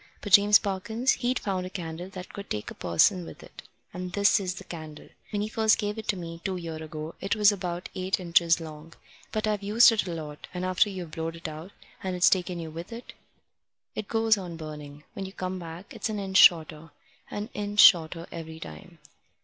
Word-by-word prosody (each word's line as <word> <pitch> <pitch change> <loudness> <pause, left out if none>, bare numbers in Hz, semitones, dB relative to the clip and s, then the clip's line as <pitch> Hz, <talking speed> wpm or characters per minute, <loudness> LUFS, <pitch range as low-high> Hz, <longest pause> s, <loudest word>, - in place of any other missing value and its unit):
But 205 - -5
James 205 +1 +8
Parkins, 220 +6 -1
he'd 250 +1 0
found 190 -3 -2
a 185 - -5
candle 175 -1 -6
that 185 -1 -9
could 200 0 -8
take 105 0 -4
a - - -7
person 90 - +2
with - - -11
it, - - -12 0.3
and 180 0 -6
this 205 +2 +4
is 185 -2 -3
the - - -9
candle. 155 -3 -9 0.2
When 205 -1 -1
he - - -2
first 220 0 +3
gave 210 0 -3
it 220 - 0
me, 165 -2 -7
two 190 -2 -2
year 165 -2 -6
ago, 155 0 -7
it 195 - 0
was 210 -1 +6
about 180 -3 -4
eight 185 +1 -1
inches 170 -1 +3
long. 160 0 -10 0.4
But 215 0 -1
I've 210 -1 0
used 215 +4 +6
it 220 -4 0
a - - -3
lot, 150 -2 -8
and 180 +1 -2
after 185 +3 +3
you've 180 -5 -7
blowed 165 +1 -4
it 165 0 -6
out, 160 +5 -8 0.3
and 185 -1 -3
it's 180 - +5
taken 180 -2 0
you 160 -1 -6
with 170 +6 -8
it, 230 +1 -9 0.8
it 215 - -5
goes 225 -2 +2
on 175 -3 -7
burning. 150 -2 -9
When 195 - -5
you 190 - -11
come 185 -1 -4
back, 170 +2 -9
it's - - -3
an 215 - -3
inch 190 -1 0
shorter 160 -2 +5 0.4
an 205 +1 -5
inch 205 0 -4
shorter 165 -2 +6
every 160 -1 -8
time. 80 - -11
180 Hz, 215 wpm, -27 LUFS, 165-205 Hz, 0.8 s, James